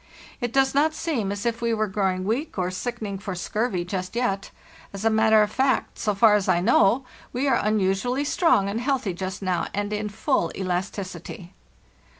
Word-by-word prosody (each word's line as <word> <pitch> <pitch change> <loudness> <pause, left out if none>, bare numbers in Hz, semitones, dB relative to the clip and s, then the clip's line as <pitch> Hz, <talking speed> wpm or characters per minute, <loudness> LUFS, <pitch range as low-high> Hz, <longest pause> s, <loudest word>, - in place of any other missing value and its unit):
It 240 -3 -2
does 270 +1 +3
not 310 +3 +2
seem 240 -12 -1
as 205 +1 -4
if 235 0 -1
we 230 -1 +1
were 215 0 +1
growing 190 -2 -1
weak 230 +10 -2
or 180 -1 0
sickening 210 -1 -4
for 195 -1 -5
scurvy 190 0 -2
just 185 +2 -4
yet. 200 -5 -1 0.4
As 200 +2 -5
a 225 - +4
matter 220 0 +5
of 210 - -2
fact, 265 +2 0
so 210 -2 0
far 215 +1 +6
as 205 -2 +2
I 180 -2 +3
know, 230 +5 +3 0.3
we 260 +3 -1
are 250 -4 +3
unusually 215 +6 +1
strong 295 - +3
and 210 +4 -2
healthy 255 -7 0
just 190 +2 -5
now 185 -2 0
and 205 +1 -2
in 210 0 -2
full 200 -5 0
elasticity. 185 -1 -4
210 Hz, 185 wpm, -24 LUFS, 190-240 Hz, 0.4 s, far